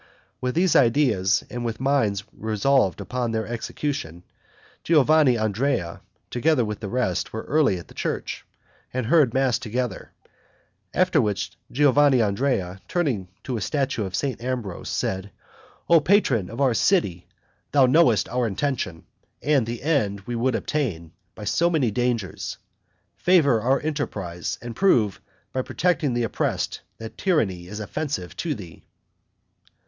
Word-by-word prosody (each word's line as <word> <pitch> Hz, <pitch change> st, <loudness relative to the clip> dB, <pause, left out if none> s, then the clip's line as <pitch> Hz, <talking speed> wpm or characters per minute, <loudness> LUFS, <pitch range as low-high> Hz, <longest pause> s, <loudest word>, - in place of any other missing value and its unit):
With 125 Hz, 0 st, -1 dB
these 175 Hz, 0 st, +3 dB
ideas, 115 Hz, -7 st, +3 dB
and 120 Hz, 0 st, -5 dB
with 115 Hz, -1 st, -3 dB
minds 130 Hz, -7 st, +1 dB
resolved 110 Hz, 0 st, +1 dB
upon 120 Hz, +5 st, -2 dB
their 110 Hz, -1 st, -1 dB
execution, 110 Hz, -, -4 dB, 0.6 s
Giovanandrea, 130 Hz, -, +2 dB, 0.3 s
together 130 Hz, 0 st, +2 dB
with 105 Hz, -1 st, -4 dB
the 105 Hz, -, -5 dB
rest, 120 Hz, -7 st, -1 dB
were 110 Hz, -, -5 dB
early 145 Hz, -10 st, +2 dB
at 85 Hz, -, -10 dB
the -, -, -15 dB
church, -, -, -3 dB, 0.5 s
and 130 Hz, -1 st, -2 dB
heard 140 Hz, -1 st, +4 dB
mass 130 Hz, -3 st, +2 dB
together; 120 Hz, -2 st, -4 dB, 0.8 s
after -, -, +3 dB
which, 100 Hz, -2 st, -1 dB, 0.2 s
Giovanandrea, 125 Hz, -8 st, +2 dB
turning 135 Hz, -, -1 dB, 0.2 s
to 125 Hz, -3 st, -3 dB
a -, -, -4 dB
statue 135 Hz, +1 st, -1 dB
of 95 Hz, -2 st, -4 dB
St. 130 Hz, -3 st, -2 dB
Ambrose, 120 Hz, -8 st, -4 dB
said, 95 Hz, +1 st, -2 dB, 0.6 s
"O 170 Hz, -1 st, +7 dB
patron 140 Hz, -, +2 dB
of 115 Hz, +4 st, -8 dB
our 135 Hz, -3 st, +3 dB
city! 105 Hz, -, +1 dB, 0.4 s
thou 140 Hz, -2 st, +5 dB
knowest 130 Hz, -4 st, +4 dB
our 125 Hz, -1 st, 0 dB
intention, 105 Hz, -, -2 dB, 0.4 s
and 140 Hz, -6 st, +2 dB
the 120 Hz, +1 st, -5 dB
end 110 Hz, -11 st, +1 dB
we 120 Hz, +4 st, -5 dB
would 120 Hz, +1 st, +1 dB
attain, 100 Hz, -, -2 dB, 0.2 s
by 105 Hz, -, -9 dB
so 170 Hz, -, +2 dB
many 145 Hz, -9 st, +1 dB
dangers; 120 Hz, -4 st, -2 dB, 0.6 s
favor 145 Hz, -11 st, +4 dB
our 130 Hz, +4 st, +2 dB
enterprise, 100 Hz, -, -3 dB
and 120 Hz, -1 st, -6 dB
prove, 115 Hz, -, +2 dB, 0.3 s
by 130 Hz, -, 0 dB
protecting 150 Hz, -3 st, 0 dB
the 120 Hz, -, +1 dB
oppressed, 115 Hz, -, -2 dB, 0.2 s
that 110 Hz, 0 st, -9 dB
tyranny 95 Hz, -, 0 dB
is 105 Hz, +3 st, -7 dB
offensive 120 Hz, -, -4 dB
to 160 Hz, -4 st, -2 dB
thee." 90 Hz, -, -11 dB
120 Hz, 140 wpm, -24 LUFS, 105-140 Hz, 0.8 s, O